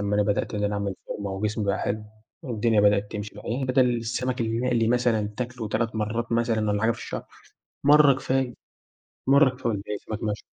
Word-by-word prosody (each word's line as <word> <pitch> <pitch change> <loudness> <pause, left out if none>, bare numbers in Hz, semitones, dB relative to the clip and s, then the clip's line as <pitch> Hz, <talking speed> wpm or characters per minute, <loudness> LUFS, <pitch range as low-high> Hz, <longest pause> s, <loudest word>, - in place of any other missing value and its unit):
أمّا 100 0 0
أنا 105 - +4
بدأت 105 +1 -1
إن 105 0 -1
أنا 105 0 0
أعمل 100 -1 -2
فورمة 100 -2 -4
وجسمي 105 +2 -2
بقى 100 -1 0
حلو 105 +1 -2 0.4
والدنيا 115 -5 +1
بدأت 105 0 +3
تمشي. 105 0 -5
المهم 130 +3 -2
بَدَل 125 -2 +3
السَمَك 125 +2 -2
المقلي 115 0 +1
مثلًا 120 -3 +2
تاكله 120 -3 -4
3 110 0 -1
مرّات 115 +2 -2
مثلًا 115 -2 +1
والّا 105 0 0
حاجة 115 - +4
في 115 - -3
الشهر، - - -5 0.6
مرّة 145 0 +7
كفاية. 130 -1 -1 0.7
مرّة 140 +1 +6
كفاية 125 -1 -4
والباقي 105 0 -3
سَمَك 110 -1 -6
مشوي. 105 -1 -2
115 Hz, 185 wpm, -25 LUFS, 105-125 Hz, 0.7 s, مرّة